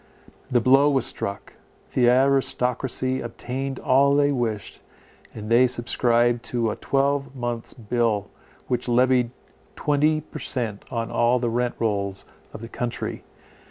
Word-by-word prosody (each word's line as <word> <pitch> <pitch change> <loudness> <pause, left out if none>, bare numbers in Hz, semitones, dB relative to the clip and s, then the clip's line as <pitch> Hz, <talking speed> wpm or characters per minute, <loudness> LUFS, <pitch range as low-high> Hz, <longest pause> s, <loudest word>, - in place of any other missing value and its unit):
The 125 - +3
blow 135 +5 +5
was 135 -4 +1
struck; 100 0 -4 0.4
the 120 -2 +4
aristocracy 130 0 +1
obtained 130 +3 -5
all 140 +2 +3
they 145 0 +3
wished, 115 -7 -3 0.5
and 105 -1 -7
they 120 +3 +5
subscribed 120 -1 +1
to 115 -3 -1
a - - -4
twelvemonths' 135 -4 -2
bill, 115 -3 0 0.4
which 125 0 -2
levied 125 0 +3 0.5
twenty 150 +1 +1
per 155 - -10
cent 115 -6 -3
on 115 -1 -3
all 120 +2 +3
the 120 -2 -1
rent 120 +1 -1
rolls 100 -3 -2 0.3
of - - -9
the 115 - -7
country. 120 +1 -4
125 Hz, 130 wpm, -24 LUFS, 115-135 Hz, 0.5 s, blow